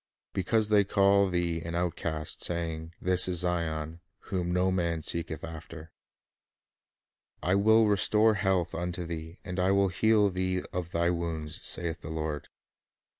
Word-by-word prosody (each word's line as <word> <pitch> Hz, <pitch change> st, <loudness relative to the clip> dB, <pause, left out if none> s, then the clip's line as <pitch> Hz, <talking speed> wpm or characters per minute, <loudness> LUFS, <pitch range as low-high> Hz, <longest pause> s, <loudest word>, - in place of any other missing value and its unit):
"Because 105 Hz, +3 st, +1 dB
they 105 Hz, -1 st, +5 dB
call 100 Hz, 0 st, +3 dB
thee 85 Hz, -2 st, -1 dB
an 85 Hz, +1 st, -5 dB
Outcast, 85 Hz, -3 st, -3 dB
saying, 80 Hz, -1 st, -3 dB
This 90 Hz, 0 st, +3 dB
is 90 Hz, -1 st, +1 dB
Zion, 85 Hz, -2 st, -2 dB, 0.3 s
whom 90 Hz, -2 st, -1 dB
no 90 Hz, +1 st, +2 dB
man 85 Hz, -3 st, -1 dB
seeketh 80 Hz, -1 st, -2 dB
after," 80 Hz, 0 st, -9 dB, 1.5 s
"I 90 Hz, -, +2 dB
will 110 Hz, +3 st, +5 dB
restore 105 Hz, +2 st, +3 dB
health 95 Hz, -4 st, 0 dB
unto 90 Hz, +1 st, -3 dB
thee, 80 Hz, 0 st, -6 dB
and 90 Hz, 0 st, -5 dB
I 90 Hz, +1 st, +2 dB
will 100 Hz, 0 st, +3 dB
heal 105 Hz, +2 st, +3 dB
thee 95 Hz, 0 st, -1 dB
of 90 Hz, -2 st, -3 dB
thy 85 Hz, +1 st, +1 dB
wounds, 80 Hz, -3 st, -4 dB
saith 85 Hz, -1 st, -2 dB
the -, -, -8 dB
Lord." 80 Hz, -2 st, -3 dB
90 Hz, 145 wpm, -29 LUFS, 80-95 Hz, 1.5 s, they